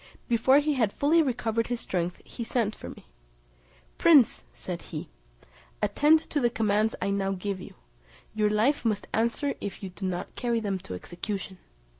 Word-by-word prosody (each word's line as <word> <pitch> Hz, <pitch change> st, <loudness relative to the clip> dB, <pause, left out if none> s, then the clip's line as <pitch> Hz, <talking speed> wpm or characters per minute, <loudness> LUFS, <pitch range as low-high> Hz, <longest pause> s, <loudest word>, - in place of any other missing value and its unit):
Before 240 Hz, +3 st, +4 dB
he 295 Hz, +1 st, +2 dB
had 230 Hz, -7 st, +1 dB
fully 310 Hz, +8 st, +3 dB
recovered 230 Hz, -5 st, 0 dB
his 245 Hz, -1 st, -2 dB
strength 175 Hz, -4 st, -2 dB
he 235 Hz, -, -6 dB
sent 225 Hz, -2 st, 0 dB
for -, -, -9 dB
me: -, -, -12 dB, 0.9 s
"Prince," 280 Hz, -, +5 dB
said 65 Hz, -, -6 dB
he, -, -, -7 dB, 0.7 s
"attend 295 Hz, +10 st, +4 dB
to 295 Hz, -, +1 dB
the 240 Hz, -3 st, +3 dB
commands 215 Hz, -1 st, +1 dB
I 200 Hz, -, -1 dB
now 195 Hz, -1 st, 0 dB
give 195 Hz, 0 st, -4 dB
you; -, -, -11 dB, 0.6 s
your 215 Hz, -1 st, +2 dB
life 220 Hz, +8 st, +2 dB
must 215 Hz, -3 st, 0 dB
answer 235 Hz, +6 st, +1 dB
if 200 Hz, 0 st, -6 dB
you 190 Hz, -, -4 dB
do 190 Hz, +1 st, -5 dB
not 180 Hz, -1 st, -4 dB
carry 235 Hz, -1 st, 0 dB
them 205 Hz, -3 st, -2 dB
into 180 Hz, -, -5 dB
execution." 190 Hz, -, -5 dB
220 Hz, 170 wpm, -27 LUFS, 195-245 Hz, 0.9 s, Prince